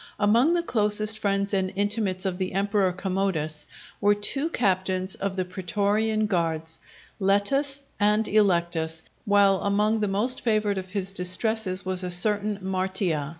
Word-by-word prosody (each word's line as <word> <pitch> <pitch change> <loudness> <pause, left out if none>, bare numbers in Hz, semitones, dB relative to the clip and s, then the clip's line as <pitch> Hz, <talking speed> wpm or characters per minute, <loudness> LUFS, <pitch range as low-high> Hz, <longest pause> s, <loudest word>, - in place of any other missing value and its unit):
Among 235 +11 +3
the 340 - +1
closest 215 -4 +2
friends 200 0 -1
and 190 -1 0
intimates 205 -2 -1
of 185 -1 -2
the 185 -1 -3
Emperor 200 -1 +1
Commodus, 180 -5 -2 0.3
were 205 0 +4
two 275 +9 -1
captains 185 - 0
of 195 -1 -4
the 185 -1 -2
pretorian 205 +4 -1
guards, 165 -4 -2 0.4
Letus 275 +9 +1 0.2
and 210 +1 +2
Electus, 170 -6 +1 0.2
while 200 -2 +3
among 210 +2 +1
the 210 - 0
most 220 +7 +1
favoured 215 -3 +1
of 185 0 -9
his 195 0 -3
distresses 190 +1 0
was 185 0 0
a 180 - -2
certain 205 +3 +2
Martia. 185 -5 -1
200 Hz, 145 wpm, -25 LUFS, 185-210 Hz, 0.4 s, were